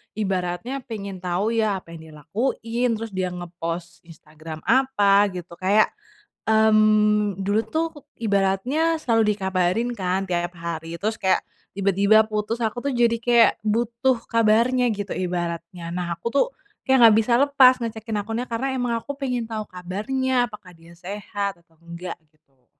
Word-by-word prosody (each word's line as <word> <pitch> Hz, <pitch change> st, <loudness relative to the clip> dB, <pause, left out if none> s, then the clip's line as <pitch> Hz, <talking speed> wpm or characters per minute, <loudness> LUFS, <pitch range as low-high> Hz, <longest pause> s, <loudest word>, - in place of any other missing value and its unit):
ibaratnya 190 Hz, +3 st, -2 dB
pengen 200 Hz, -5 st, -6 dB
tahu 180 Hz, +4 st, -1 dB
ya 220 Hz, -, +2 dB
apa 170 Hz, -, -17 dB
yang 165 Hz, -, -9 dB
dia 160 Hz, -1 st, -14 dB
lakuin, 235 Hz, -, -1 dB
terus 225 Hz, 0 st, -6 dB
dia 185 Hz, -1 st, -1 dB
ngepost 175 Hz, -1 st, -6 dB
Instagram 155 Hz, -1 st, -11 dB
apa 205 Hz, -7 st, +4 dB
gitu, 175 Hz, -1 st, -7 dB
kayak, 200 Hz, +3 st, +3 dB, 0.6 s
mmm, 215 Hz, -2 st, +4 dB
dulu 205 Hz, +2 st, +1 dB
tuh 320 Hz, +1 st, +1 dB, 0.3 s
ibaratnya 225 Hz, +10 st, +1 dB
selalu 230 Hz, -6 st, +2 dB
dikabarin 190 Hz, +3 st, 0 dB
kan 190 Hz, -2 st, -1 dB
tiap 175 Hz, 0 st, -1 dB
hari 165 Hz, 0 st, -5 dB
terus 220 Hz, +2 st, -1 dB
kayak 190 Hz, -, +3 dB, 0.4 s
tiba-tiba 200 Hz, +2 st, +4 dB
putus 215 Hz, +2 st, -2 dB
aku 240 Hz, +2 st, -2 dB
tuh 280 Hz, -, 0 dB
jadi 230 Hz, -1 st, +4 dB
kayak 235 Hz, -1 st, +6 dB
butuh 235 Hz, +4 st, +1 dB
kabarnya 230 Hz, +3 st, +3 dB
gitu 205 Hz, -2 st, -4 dB
ibaratnya. 175 Hz, -1 st, -4 dB
Nah 180 Hz, -1 st, -2 dB
aku 170 Hz, -, -13 dB
tuh, 280 Hz, -, +4 dB, 0.4 s
kayak 265 Hz, 0 st, +4 dB
nggak 220 Hz, -1 st, +6 dB
bisa 225 Hz, +2 st, -1 dB
lepas 275 Hz, -2 st, +6 dB
ngecekin 225 Hz, -2 st, -4 dB
akunnya 225 Hz, +4 st, -3 dB
karena 230 Hz, +4 st, -2 dB
emang 245 Hz, -2 st, -1 dB
aku 285 Hz, -, -6 dB
pengen 250 Hz, -4 st, -1 dB
tahu 220 Hz, -1 st, -4 dB
kabarnya 245 Hz, +8 st, -1 dB
apakah 195 Hz, -4 st, -12 dB
dia 165 Hz, +1 st, -17 dB
sehat 200 Hz, +2 st, -4 dB
atau 165 Hz, -1 st, -32 dB
enggak 170 Hz, +1 st, -7 dB, 0.2 s
gitu. 135 Hz, -5 st, -38 dB
210 Hz, 150 wpm, -23 LUFS, 180-230 Hz, 0.6 s, kayak